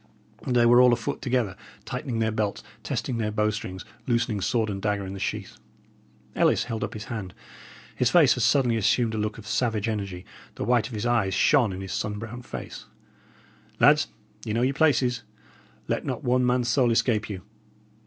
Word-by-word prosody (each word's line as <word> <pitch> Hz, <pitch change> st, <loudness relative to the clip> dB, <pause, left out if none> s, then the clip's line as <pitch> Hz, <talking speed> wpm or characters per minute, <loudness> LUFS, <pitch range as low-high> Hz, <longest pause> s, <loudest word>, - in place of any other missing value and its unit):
They 120 Hz, -2 st, +3 dB
were 120 Hz, +1 st, +7 dB
all 125 Hz, -1 st, +6 dB
afoot 120 Hz, -1 st, -3 dB
together, 125 Hz, -7 st, 0 dB, 0.3 s
tightening 120 Hz, -3 st, -4 dB
their 110 Hz, -1 st, +1 dB
belts, 105 Hz, -2 st, -2 dB, 0.2 s
testing 120 Hz, -3 st, -3 dB
their 105 Hz, -1 st, 0 dB
bow 105 Hz, 0 st, +1 dB
strings, 95 Hz, -3 st, -6 dB, 0.2 s
loosening 115 Hz, -4 st, 0 dB
sword 110 Hz, +3 st, +1 dB
and 100 Hz, -2 st, -4 dB
dagger 105 Hz, -1 st, -1 dB
in 95 Hz, -, -6 dB
the 100 Hz, -, -7 dB
sheath. -, -, -4 dB, 0.8 s
Ellis -, -, +3 dB
held 115 Hz, -2 st, -4 dB
up -, -, -4 dB
his 105 Hz, -, -6 dB
hand; 105 Hz, -6 st, -6 dB, 0.6 s
his 125 Hz, -, +2 dB
face 150 Hz, -4 st, +6 dB
had 125 Hz, -, -3 dB
suddenly 125 Hz, -2 st, +3 dB
assumed 115 Hz, +2 st, +2 dB
a 110 Hz, -, -2 dB
look 105 Hz, 0 st, -2 dB
of 110 Hz, -, -11 dB
savage 110 Hz, -1 st, 0 dB
energy; 100 Hz, -4 st, -4 dB, 0.3 s
the -, -, -4 dB
white 120 Hz, -2 st, +2 dB
of 120 Hz, -, -8 dB
his 105 Hz, +2 st, -3 dB
eyes 110 Hz, -6 st, +1 dB
shone 120 Hz, +1 st, +4 dB
in 95 Hz, +1 st, -6 dB
his 95 Hz, -2 st, -5 dB
sun 105 Hz, -1 st, -2 dB
brown 115 Hz, +3 st, -7 dB
face. -, -, -8 dB, 0.9 s
"Lads," -, -, +6 dB
he -, -, -22 dB
said, -, -, -20 dB
"ye 105 Hz, -, -1 dB
know 115 Hz, +2 st, +1 dB
your 135 Hz, +2 st, +2 dB
places. 130 Hz, -5 st, +2 dB, 0.7 s
Let -, -, -1 dB
not -, -, -4 dB
one 125 Hz, 0 st, +2 dB
man's 125 Hz, -1 st, +1 dB
soul 125 Hz, 0 st, +3 dB
escape 115 Hz, -2 st, +1 dB
you. 95 Hz, -3 st, -6 dB
115 Hz, 195 wpm, -26 LUFS, 105-125 Hz, 0.9 s, were